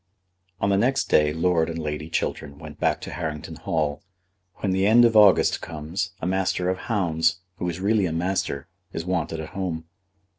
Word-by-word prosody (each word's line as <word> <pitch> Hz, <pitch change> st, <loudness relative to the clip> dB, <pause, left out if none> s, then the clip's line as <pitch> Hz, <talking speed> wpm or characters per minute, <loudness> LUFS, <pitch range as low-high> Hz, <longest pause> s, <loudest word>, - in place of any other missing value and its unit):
On 100 Hz, -, +1 dB
the 100 Hz, -, +3 dB
next 130 Hz, +5 st, +1 dB
day 75 Hz, 0 st, +4 dB
Lord 80 Hz, +1 st, +1 dB
and 85 Hz, -, -4 dB
Lady 75 Hz, 0 st, -4 dB
Chiltern 70 Hz, -3 st, -3 dB
went -, -, -11 dB
back -, -, +1 dB
to -, -, -7 dB
Harrington 75 Hz, -3 st, -5 dB
Hall. 75 Hz, -2 st, -1 dB, 0.5 s
When 100 Hz, -, -2 dB
the 95 Hz, +1 st, +2 dB
end 120 Hz, +3 st, +7 dB
of 115 Hz, -1 st, +2 dB
August 105 Hz, -3 st, +6 dB
comes, 85 Hz, +5 st, -4 dB
a -, -, -4 dB
Master 90 Hz, -1 st, 0 dB
of 95 Hz, -, -4 dB
Hounds, 85 Hz, -5 st, +1 dB, 0.2 s
who 90 Hz, -, -2 dB
is 85 Hz, +1 st, -5 dB
really 100 Hz, 0 st, +2 dB
a -, -, -3 dB
master, 85 Hz, -5 st, -2 dB, 0.3 s
is 80 Hz, -, -4 dB
wanted 85 Hz, -3 st, -1 dB
at 80 Hz, 0 st, -6 dB
home. 85 Hz, -3 st, -4 dB
90 Hz, 185 wpm, -24 LUFS, 80-95 Hz, 0.5 s, end